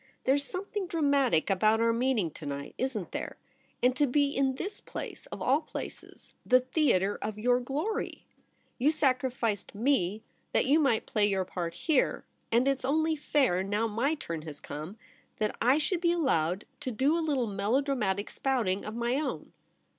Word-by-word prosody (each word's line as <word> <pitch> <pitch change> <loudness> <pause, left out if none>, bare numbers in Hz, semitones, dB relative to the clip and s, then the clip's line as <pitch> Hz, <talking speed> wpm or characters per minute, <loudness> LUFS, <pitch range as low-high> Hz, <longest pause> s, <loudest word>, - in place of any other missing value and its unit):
There's 280 +2 +2
something 385 +4 -4
dramatic 280 - +2
about 215 +3 +3
our 230 0 +3
meeting 230 -8 +1
to 150 - -10
night, 140 0 -5
isn't 245 -8 -2
there? - - -5 0.5
And 250 0 +4
to 290 - +3
be 285 +2 +2
in 270 -1 +2
this 390 +9 -5
place - - -7
— - - -23
of - - -5
all - - +3
places - - -8
— - - -44
the 255 0 +5
theatre 245 - +2
of 215 0 -4
your 245 +3 +3
glory! 290 - -3 0.5
You 270 +5 +4
sacrificed 255 -8 0
me 215 -4 +1 0.3
that - - +3
you 290 +4 +4
might 270 -7 +2
play 210 -1 +2
your 190 -2 0
part 170 -2 -4
here; 305 - +1 0.3
and 240 +3 +3
it's 275 -1 +1
only 315 +4 +2
fair, 270 -10 +2
now 205 +3 0
'my 240 +8 0
turn 170 - -5
has 155 -2 -8
come, 155 +8 -7 0.4
that 215 -1 -1
I 255 +4 +5
should 335 +3 0
be 340 -1 +3
allowed 190 - +1
to 290 - -4
do 265 +7 +2
a 335 - +1
little 285 -6 +1
melodramatic 210 0 0
spouting 225 -8 0
of 215 - -6
my 240 +2 0
own.' 300 - -4
250 Hz, 175 wpm, -29 LUFS, 205-285 Hz, 0.5 s, the